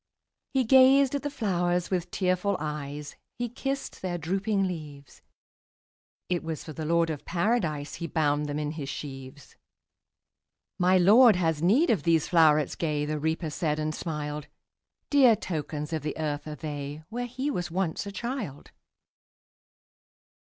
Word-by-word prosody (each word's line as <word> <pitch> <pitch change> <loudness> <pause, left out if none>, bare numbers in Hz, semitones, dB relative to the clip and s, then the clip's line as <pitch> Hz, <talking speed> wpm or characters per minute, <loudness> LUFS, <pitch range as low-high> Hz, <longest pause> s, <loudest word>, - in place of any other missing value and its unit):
'' - - -60
He 265 - +4
gazed 265 +2 +6
at 285 - -1
the 290 - -2
flowers 180 -9 -1
with 180 -2 -1
tearful 185 +1 0
eyes, 150 -1 -5 0.2
He 245 -1 -2
kissed 270 +3 -4
their 180 -2 -2
drooping 195 +5 0
leaves; 150 -5 -8 1.1
It 180 -1 -1
was 160 -2 -4
for 155 - -8
the 155 +1 -5
Lord 165 +1 +2
of 150 - -6
Paradise 170 -6 -1
He 170 - -5
bound 150 -2 +1
them 145 0 -3
in 150 0 -2
his 150 -4 -6
sheaves. 135 -1 -8 1.3
``My 185 +1 +5
Lord 220 +5 +7
has 165 -4 0
need 235 - +4
of 205 -9 +1
these 165 0 +2
flowerets 155 -4 +4
gay,'' 150 -3 -1
The 150 0 -2
Reaper 160 +1 -1
said, 150 -2 -1
and 155 0 -2
smiled; 150 -2 -4 0.6
``Dear 255 -7 +6
tokens 155 -2 -4
of 160 - -1
the 150 0 -4
earth 150 -1 -3
are 150 - -5
they, 145 -1 -6
Where 245 +2 -3
he 260 +4 -3
was 175 - -3
once 180 +2 -2
a - - -5
child. 210 - -5
165 Hz, 155 wpm, -27 LUFS, 150-200 Hz, 1.3 s, Lord